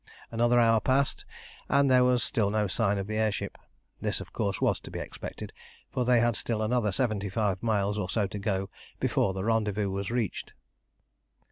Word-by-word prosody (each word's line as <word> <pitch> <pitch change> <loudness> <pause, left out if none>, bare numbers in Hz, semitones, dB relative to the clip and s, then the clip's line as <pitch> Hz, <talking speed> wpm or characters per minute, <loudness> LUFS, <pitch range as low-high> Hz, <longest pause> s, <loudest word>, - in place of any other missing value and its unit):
Another 120 +1 +3
hour 115 -1 +5
passed, 135 +4 +1 0.4
but 140 0 +4
there 130 -1 +5
was 125 -2 +3
still 110 -7 +1
no 105 0 +1
sign 100 +1 +1
of 100 - -2
the 110 +1 -3
air 110 -1 +2
ship. - - -4 0.5
This - - -1
of - - -10
course - - -1
was - - +1
to - - -11
be - - -6
expected, - - -7 0.4
for 125 - 0
they 125 -1 +4
had 120 -1 +2
still 110 -2 -1
another 110 -2 +1
seventy 100 -1 0
five 100 -2 -1
miles 105 -2 0
or 95 -3 -3
so 105 -3 +1
to 100 +1 -5
go 95 -2 -2 0.3
before 95 -1 +1
the 95 - -3
rendezvous 105 -2 0
was 100 0 -3
reached. 120 -4 -2
110 Hz, 195 wpm, -28 LUFS, 100-120 Hz, 0.5 s, hour